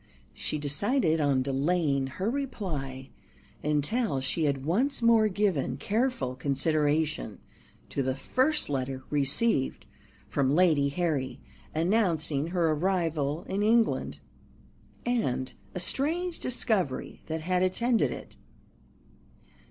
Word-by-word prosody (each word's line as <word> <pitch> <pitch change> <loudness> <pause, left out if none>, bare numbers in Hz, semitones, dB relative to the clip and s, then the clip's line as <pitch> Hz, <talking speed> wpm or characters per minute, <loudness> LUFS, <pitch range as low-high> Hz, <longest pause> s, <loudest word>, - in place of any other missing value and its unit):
She 155 - -3
decided 160 - +1
on 140 -3 +2
delaying 140 0 +1
her 190 - -1
reply 155 - -4 0.5
until 150 - +1
she 135 +5 0
had 140 -2 -1
once 245 - +1
more 230 -2 +5
given 195 -8 0
careful 215 - 0
consideration 145 -1 0 0.5
to 140 - -1
the 130 0 0
first 265 - +1
letter 130 -1 -3
received 145 - +1 0.4
from 140 0 +1
Lady 155 -6 +4
Harry, 145 -4 -1 0.4
announcing 165 -5 +1
her 170 -2 +1
arrival 160 -3 0
in 195 +2 -2
England, 225 +2 +2 0.9
and 135 - 0 0.2
a - - -2
strange 330 - 0
discovery 210 - -1
that 160 0 -3
had 180 +2 0
attended 230 +6 +2
it. - - -8
160 Hz, 105 wpm, -28 LUFS, 140-210 Hz, 0.9 s, more